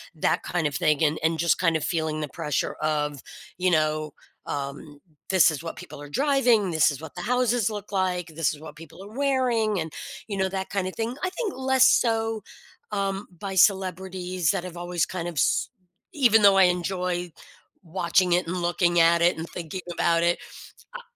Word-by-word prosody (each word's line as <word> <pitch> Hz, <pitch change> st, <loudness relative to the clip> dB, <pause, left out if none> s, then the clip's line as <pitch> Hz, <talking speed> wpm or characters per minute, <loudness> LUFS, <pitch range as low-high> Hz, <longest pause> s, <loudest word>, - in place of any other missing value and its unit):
that 155 Hz, -, 0 dB
kind 175 Hz, -3 st, -2 dB
of 145 Hz, -2 st, -1 dB
thing 150 Hz, +2 st, +2 dB
and 155 Hz, 0 st, +2 dB
and 160 Hz, 0 st, +1 dB
just 170 Hz, -1 st, +3 dB
kind 165 Hz, -3 st, +2 dB
of 160 Hz, -, -1 dB
feeling 160 Hz, -2 st, -1 dB
the 150 Hz, -, -4 dB
pressure 150 Hz, +1 st, -2 dB
of, 150 Hz, -3 st, -1 dB, 0.4 s
you 185 Hz, +1 st, +2 dB
know, 155 Hz, -2 st, 0 dB, 0.3 s
um, 145 Hz, +1 st, -6 dB, 0.3 s
this 185 Hz, -3 st, +6 dB
is 155 Hz, 0 st, -6 dB
what 165 Hz, -, -6 dB
people 145 Hz, 0 st, -10 dB
are 145 Hz, -, -9 dB
driving, 245 Hz, -, +2 dB
this 160 Hz, -1 st, +4 dB
is 145 Hz, -, -7 dB
what 160 Hz, -, -9 dB
the -, -, -5 dB
houses 245 Hz, -2 st, +1 dB
look 210 Hz, -1 st, -7 dB
like, 185 Hz, -2 st, -1 dB
this 165 Hz, -2 st, +1 dB
is 145 Hz, -, -11 dB
what 160 Hz, -, -11 dB
people 165 Hz, +3 st, -13 dB
are 210 Hz, +3 st, -12 dB
wearing 250 Hz, -7 st, +1 dB
and, 160 Hz, -2 st, -5 dB, 0.3 s
you 205 Hz, -, -4 dB
know, 190 Hz, 0 st, +1 dB
that 190 Hz, 0 st, -4 dB
kinda 185 Hz, -2 st, -2 dB
thing. 230 Hz, +5 st, -3 dB
I 370 Hz, -, +1 dB
think 410 Hz, +1 st, -4 dB
less 260 Hz, 0 st, +4 dB
so, 225 Hz, -3 st, +1 dB, 0.5 s
um, 195 Hz, -1 st, -2 dB
by 195 Hz, -1 st, -5 dB
celebrities 185 Hz, -2 st, +1 dB
that 195 Hz, -3 st, -2 dB
have 180 Hz, -1 st, -8 dB
always 175 Hz, -1 st, -1 dB
kind 175 Hz, -2 st, -5 dB
of 170 Hz, -, -9 dB
s 130 Hz, -, +1 dB, 0.4 s
even 235 Hz, -6 st, +4 dB
though 200 Hz, -1 st, +6 dB
I 190 Hz, -, +7 dB
enjoy 180 Hz, 0 st, 0 dB, 0.5 s
watching 175 Hz, +1 st, +1 dB
it 180 Hz, +1 st, +2 dB
and 180 Hz, -, -3 dB
looking 175 Hz, 0 st, +1 dB
at 170 Hz, +1 st, +5 dB
it 170 Hz, 0 st, +3 dB
and 165 Hz, +1 st, -5 dB
thinking 175 Hz, +1 st, -6 dB
about 170 Hz, 0 st, +2 dB
it, 175 Hz, 0 st, +2 dB, 0.5 s
I -, -, -6 dB
I -, -, -12 dB
180 Hz, 200 wpm, -25 LUFS, 160-205 Hz, 0.5 s, I